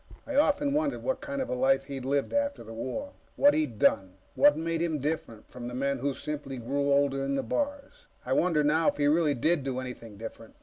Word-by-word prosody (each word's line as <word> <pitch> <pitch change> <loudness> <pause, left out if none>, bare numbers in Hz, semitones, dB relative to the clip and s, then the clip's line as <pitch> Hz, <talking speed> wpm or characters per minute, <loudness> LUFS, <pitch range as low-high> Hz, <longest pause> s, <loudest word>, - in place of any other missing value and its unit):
I 290 - -5
often 285 0 +3
wondered 295 -1 0
what - - -1
kind 280 -2 -3
of - - -8
a - - -1
life 135 +2 +2
he'd 135 -2 -7
lived 140 - 0
after 285 - 0
the 115 0 -10
war 130 - -4 0.2
what 285 +1 +5
he'd 145 -8 -1
done 95 -2 +2 0.2
that 290 +1 +5
made 165 0 -1
him 165 -3 0
different 145 -6 -4
from 125 -1 -7
the 125 - -6
men 140 +1 -1
who 140 +1 -1
simply 145 -2 -5
grew 140 +4 -1
older 140 -1 +2
in 140 0 -1
the 135 - -1
bars. 290 - -3 0.2
I - - 0
wonder, 165 -4 +2
now, 155 +2 +2
if - - +2
he 145 - +1
really 150 0 +3
did 155 +4 +1
do 130 -1 -2
anything 120 -4 -8
different. 115 +1 -9
145 Hz, 225 wpm, -28 LUFS, -, 0.2 s, what